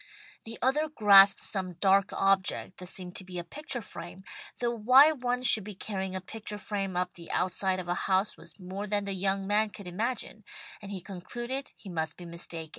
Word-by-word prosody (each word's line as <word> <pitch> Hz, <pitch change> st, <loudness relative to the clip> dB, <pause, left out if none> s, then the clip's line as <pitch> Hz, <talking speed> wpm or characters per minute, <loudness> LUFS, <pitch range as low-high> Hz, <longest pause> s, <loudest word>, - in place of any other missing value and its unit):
The 225 Hz, 0 st, -7 dB
other 300 Hz, +5 st, +2 dB
grasped 200 Hz, -7 st, +7 dB
some 185 Hz, -3 st, -2 dB
dark 195 Hz, +2 st, +3 dB
object 195 Hz, -1 st, +1 dB
that 180 Hz, -, -8 dB
seemed 180 Hz, -1 st, -4 dB
to -, -, -5 dB
be 185 Hz, -1 st, -8 dB
a 175 Hz, -, -3 dB
picture 245 Hz, -, -5 dB
frame, 175 Hz, +1 st, -9 dB, 0.3 s
though 240 Hz, -1 st, -1 dB
why 255 Hz, +7 st, +7 dB
one 250 Hz, -3 st, -2 dB
should 220 Hz, -4 st, +5 dB
be 210 Hz, 0 st, -8 dB
carrying 190 Hz, -1 st, -4 dB
a 185 Hz, -, -3 dB
picture 210 Hz, +2 st, -6 dB
frame 195 Hz, -3 st, -3 dB
up 180 Hz, -, -1 dB
the 170 Hz, -1 st, -12 dB
outside 185 Hz, +1 st, 0 dB
of 180 Hz, -, -6 dB
a 175 Hz, -, +1 dB, 0.2 s
house 190 Hz, +2 st, +2 dB
was 170 Hz, +4 st, -12 dB
more 190 Hz, +3 st, -6 dB
than 205 Hz, 0 st, 0 dB
the 200 Hz, -, -2 dB
young 195 Hz, +1 st, 0 dB
man 210 Hz, +2 st, +2 dB
could 200 Hz, 0 st, -11 dB
imagine, 215 Hz, +4 st, -3 dB, 0.4 s
and 200 Hz, -1 st, -8 dB
he 190 Hz, -2 st, -5 dB
concluded 240 Hz, +9 st, -5 dB
he -, -, -15 dB
must 160 Hz, -3 st, -3 dB
be 175 Hz, -, -10 dB
mistaken. 170 Hz, -1 st, -5 dB
195 Hz, 200 wpm, -29 LUFS, 185-220 Hz, 0.4 s, grasped